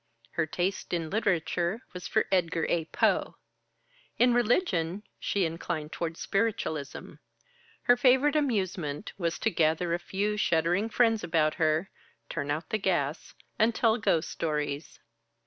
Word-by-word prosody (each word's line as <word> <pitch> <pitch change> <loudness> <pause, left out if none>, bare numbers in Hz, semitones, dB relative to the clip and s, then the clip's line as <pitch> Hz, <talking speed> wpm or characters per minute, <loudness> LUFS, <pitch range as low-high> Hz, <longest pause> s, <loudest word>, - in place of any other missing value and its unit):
Her 160 -1 -1
taste 180 +3 -2
in 165 -2 -2
literature 190 -1 0
was 180 -1 -6
for - - +2
Edgar 170 -3 +1
A. 165 -2 +1
Poe. - - +1 0.8
In 245 0 +5
religion 210 - +1 0.2
she 195 -3 0
inclined 160 -1 -4
toward 165 -1 -4
spiritualism. 195 -9 -2 0.7
Her 245 - +6
favorite 260 +4 +4
amusement 190 - -1
was 170 -2 -1
to 225 - 0
gather 165 +1 +1
a 170 - 0
few 205 +4 -2
shuddering 175 +4 +1
friends 225 -2 +2
about 155 -2 +2
her, 160 +2 +1 0.4
turn 140 - -3
out 155 +3 -2
the 215 - +1
gas, 165 -6 -1 0.2
and 220 +1 +3
tell 230 0 +3
ghost 185 -7 +1
stories. 150 -1 -3
175 Hz, 135 wpm, -29 LUFS, 160-215 Hz, 0.8 s, Her